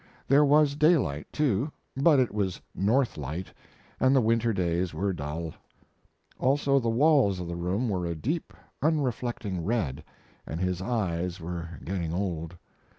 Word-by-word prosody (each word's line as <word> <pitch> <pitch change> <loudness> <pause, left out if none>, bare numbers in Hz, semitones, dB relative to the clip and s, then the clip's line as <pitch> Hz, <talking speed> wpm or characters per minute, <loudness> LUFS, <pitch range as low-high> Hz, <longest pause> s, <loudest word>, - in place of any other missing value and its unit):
There 140 +2 +6
was 145 0 +4
daylight, 145 - +2
too, 140 -1 +1 0.2
but 140 +1 +5
it 125 -4 +1
was 100 -4 -1
north 115 - +1
light, 75 +6 -5 0.5
and 130 +1 +4
the - - +6
winter 115 +1 +2
days 90 -2 -1
were 100 0 0
dull. 80 +1 -4 0.9
Also 140 +1 +3
the 115 -3 -1
walls 125 - +4
of 90 - -5
the 85 - -4
room 90 +8 -1
were 90 -5 -1
a 85 - -2
deep, 150 - -3 0.3
unreflecting 120 - -1
red, 80 - -1 0.4
and 80 - -4
his 90 -1 -1
eyes 90 -5 -1
were 85 0 -5 0.2
getting 85 -3 -2
old. 85 -3 -3
100 Hz, 150 wpm, -28 LUFS, 85-130 Hz, 0.9 s, There